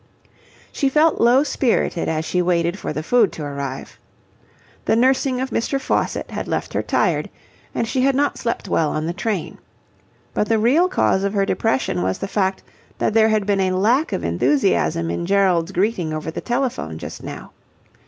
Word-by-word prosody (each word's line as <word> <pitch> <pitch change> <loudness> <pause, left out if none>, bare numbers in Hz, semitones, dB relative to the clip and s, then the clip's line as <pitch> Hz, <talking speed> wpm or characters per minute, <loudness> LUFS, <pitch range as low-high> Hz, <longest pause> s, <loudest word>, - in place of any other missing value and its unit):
She 275 - 0
felt 310 +3 +3
low 245 +4 +5
spirited 245 - 0
as 160 0 -1
she 180 - 0
waited 175 +1 0
for - - -4
the 155 - -4
food 230 +2 +3
to 155 - -6
arrive. 140 -2 -6 0.9
The - - +3
nursing 255 +1 +2
of 260 +1 -3
Mr. 270 +4 -1
Faucitt 265 - -1
had - - -4
left - - -3
her - - 0
tired, - - 0 0.5
and 230 - 0
she 255 +2 0
had 270 0 +3
not 285 +1 0
slept 235 - -3
well 155 -2 +1
on 155 +1 -2
the 170 - -2
train. 200 -2 -3 0.7
But 210 - 0
the 225 - +3
real 275 +12 +3
cause 190 - +1
of 200 0 -1
her 200 -1 +2
depression 130 - 0
was 95 +1 -1
the 195 - -4
fact 190 -1 -1 0.3
that - - 0
there 220 0 +5
had 215 -2 +1
been 200 -1 +1
a 185 -1 +1
lack 245 - +2
of - - -2
enthusiasm 170 - +1
in 170 - -3
Gerald's 190 -3 +2
greeting 185 -4 0
over 155 +1 -4
the - - -5
telephone 240 - -2
just - - -8
now. - - -8
200 Hz, 185 wpm, -21 LUFS, 170-245 Hz, 0.9 s, low